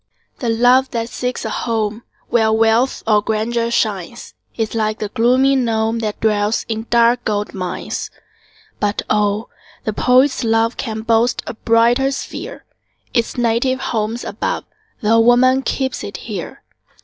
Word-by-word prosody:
The 240 Hz, -, -2 dB
love 245 Hz, +3 st, +4 dB
that 230 Hz, -1 st, -3 dB
seeks 250 Hz, +1 st, -4 dB
a -, -, -3 dB
home 220 Hz, -1 st, -2 dB, 0.3 s
Where 220 Hz, -2 st, +3 dB
wealth 225 Hz, +3 st, +2 dB
or 210 Hz, -2 st, +3 dB
grandeur 230 Hz, +2 st, -1 dB
shines, 215 Hz, -2 st, -2 dB, 0.2 s
Is 225 Hz, -2 st, -2 dB
like 215 Hz, -1 st, 0 dB
the 210 Hz, -2 st, -4 dB
gloomy 255 Hz, +5 st, +3 dB
gnome, 225 Hz, -2 st, 0 dB
That 215 Hz, -2 st, -3 dB
dwells 210 Hz, 0 st, +1 dB
in 225 Hz, 0 st, -4 dB
dark 235 Hz, +1 st, +3 dB
gold 210 Hz, -1 st, -2 dB
mines. 185 Hz, -2 st, -4 dB, 0.7 s
But 205 Hz, 0 st, -1 dB
oh! 210 Hz, +1 st, +1 dB, 0.3 s
the 215 Hz, -, -2 dB
poet's 255 Hz, +4 st, +3 dB
love 225 Hz, +1 st, +2 dB
Can 220 Hz, -3 st, -4 dB
boast 230 Hz, +1 st, +1 dB
a -, -, -5 dB
brighter 235 Hz, +4 st, +3 dB
sphere; 275 Hz, -, -6 dB, 0.5 s
Its 235 Hz, -1 st, 0 dB
native 240 Hz, +2 st, +1 dB
home's 225 Hz, 0 st, -2 dB
above, -, -, -3 dB, 0.4 s
Tho' 225 Hz, +2 st, +3 dB
woman 250 Hz, +3 st, +5 dB
keeps 265 Hz, -1 st, -2 dB
it -, -, -6 dB
here. -, -, -7 dB
230 Hz, 145 wpm, -18 LUFS, 220-245 Hz, 0.7 s, woman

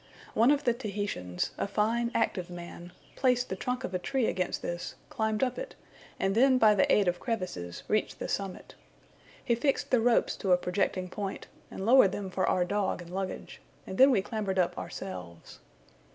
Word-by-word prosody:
One 230 Hz, +4 st, +4 dB
of 290 Hz, 0 st, +3 dB
the 240 Hz, -, +3 dB
Tahitians, 205 Hz, -, -3 dB
a -, -, 0 dB
fine 230 Hz, +4 st, +1 dB
active 185 Hz, -5 st, 0 dB
man, 175 Hz, 0 st, -9 dB, 0.2 s
placed 250 Hz, -2 st, +2 dB
the 190 Hz, -, -2 dB
trunk 250 Hz, +6 st, -3 dB
of 190 Hz, -, -4 dB
a 180 Hz, -, 0 dB
tree 255 Hz, +6 st, 0 dB
against 180 Hz, -3 st, -1 dB
this, 175 Hz, 0 st, -4 dB, 0.2 s
climbed 220 Hz, +1 st, 0 dB
up 255 Hz, -1 st, -1 dB
it, -, -, -7 dB, 0.4 s
and 195 Hz, 0 st, +1 dB
then 260 Hz, +4 st, +5 dB
by 220 Hz, -3 st, +6 dB
the 195 Hz, -, +3 dB
aid 205 Hz, -3 st, +4 dB
of 175 Hz, 0 st, +1 dB
crevices 180 Hz, -, -4 dB
reached 215 Hz, -, 0 dB
the -, -, -4 dB
summit. 195 Hz, -2 st, -4 dB, 0.7 s
He 240 Hz, -, +3 dB
fixed 270 Hz, +4 st, 0 dB
the 250 Hz, -3 st, +4 dB
ropes 240 Hz, 0 st, +3 dB
to 190 Hz, -2 st, +2 dB
a -, -, +6 dB
projecting 185 Hz, 0 st, -1 dB
point, 195 Hz, +1 st, -5 dB, 0.2 s
and 190 Hz, -, -6 dB
lowered 230 Hz, -5 st, +6 dB
them 195 Hz, -2 st, -4 dB
for 185 Hz, 0 st, 0 dB
our 180 Hz, -, +2 dB
dog 195 Hz, -1 st, -1 dB
and 170 Hz, -, -13 dB
luggage, 190 Hz, 0 st, -5 dB, 0.2 s
and 190 Hz, -, -7 dB
then 265 Hz, +2 st, +9 dB
we 205 Hz, -8 st, +3 dB
clambered 205 Hz, -3 st, -3 dB
up 180 Hz, -2 st, +2 dB
ourselves. 90 Hz, -, -8 dB
200 Hz, 190 wpm, -29 LUFS, 185-235 Hz, 0.7 s, then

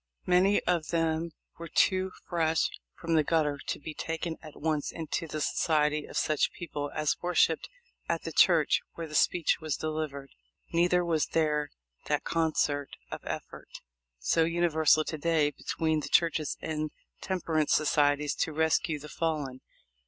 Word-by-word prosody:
Many 185 Hz, +3 st, +4 dB
of 170 Hz, -3 st, 0 dB
them 165 Hz, 0 st, 0 dB, 0.3 s
were 170 Hz, -, -6 dB
too 185 Hz, +3 st, +2 dB, 0.2 s
fresh 165 Hz, -2 st, +1 dB, 0.2 s
from 165 Hz, -1 st, -3 dB
the 155 Hz, -1 st, +4 dB
gutter 150 Hz, -2 st, +1 dB
to -, -, -2 dB
be 155 Hz, +1 st, -7 dB
taken 165 Hz, +1 st, -3 dB
at 155 Hz, -2 st, -12 dB
once 155 Hz, -2 st, -1 dB
into 165 Hz, 0 st, -4 dB
the 155 Hz, 0 st, -4 dB
society 150 Hz, -1 st, +1 dB
of -, -, -6 dB
such 155 Hz, -1 st, +1 dB
people 145 Hz, -4 st, -5 dB
as 155 Hz, -1 st, 0 dB
worshipped 175 Hz, -2 st, +2 dB, 0.4 s
at -, -, -1 dB
the -, -, -4 dB
church -, -, +4 dB
where 165 Hz, -, -5 dB
the 155 Hz, -, -11 dB
speech 170 Hz, +2 st, +2 dB
was 155 Hz, -2 st, -2 dB
delivered. 155 Hz, -3 st, -4 dB, 0.4 s
Neither 175 Hz, +1 st, +3 dB
was 160 Hz, -3 st, +1 dB
there 150 Hz, -2 st, +1 dB, 0.4 s
that -, -, 0 dB
concert 150 Hz, -3 st, 0 dB, 0.2 s
of -, -, -5 dB
effort -, -, -6 dB, 0.5 s
so 60 Hz, -, +2 dB
universal 160 Hz, -2 st, +3 dB
to 155 Hz, 0 st, -5 dB
day 155 Hz, -2 st, +2 dB
between 160 Hz, +1 st, -1 dB
the -, -, -5 dB
churches 165 Hz, -3 st, +2 dB
and 155 Hz, -1 st, -3 dB, 0.3 s
temperance 160 Hz, -5 st, 0 dB
societies 145 Hz, -1 st, +2 dB
to 160 Hz, -, -1 dB
rescue 160 Hz, 0 st, +1 dB
the 150 Hz, +1 st, -10 dB
fallen. 150 Hz, -5 st, -2 dB
160 Hz, 150 wpm, -29 LUFS, 150-165 Hz, 0.5 s, Many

